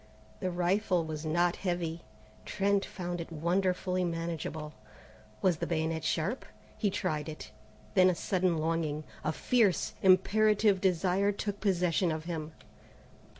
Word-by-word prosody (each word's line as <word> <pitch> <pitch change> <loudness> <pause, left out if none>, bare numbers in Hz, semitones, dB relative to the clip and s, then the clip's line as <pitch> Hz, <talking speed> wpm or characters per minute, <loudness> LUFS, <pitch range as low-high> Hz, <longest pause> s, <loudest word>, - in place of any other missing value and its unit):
The 185 - -1
rifle 180 0 +1
was 155 0 -5
not 175 +2 +2
heavy. 175 -3 -2 0.4
Trent 200 0 +1
found 175 -1 -5
it 170 - -8
wonderfully 180 +3 0
manageable. 165 -3 -4 0.7
Was 180 -4 +3
the - - -3
bayonet 160 -1 -1
sharp? 160 +10 -1 0.3
He 210 - 0
tried 160 -6 -2
it. 155 - -8 0.4
Then 185 -1 +6
a 180 - +1
sudden 180 -1 0
longing, 155 -1 -1 0.2
a 155 - +1
fierce, 205 +1 +2
imperative 205 +1 +4
desire 190 +2 +2
took 205 0 -4
possession 180 -3 +1
of 155 0 -3
him. 160 -2 -4
175 Hz, 130 wpm, -31 LUFS, 160-190 Hz, 0.7 s, Then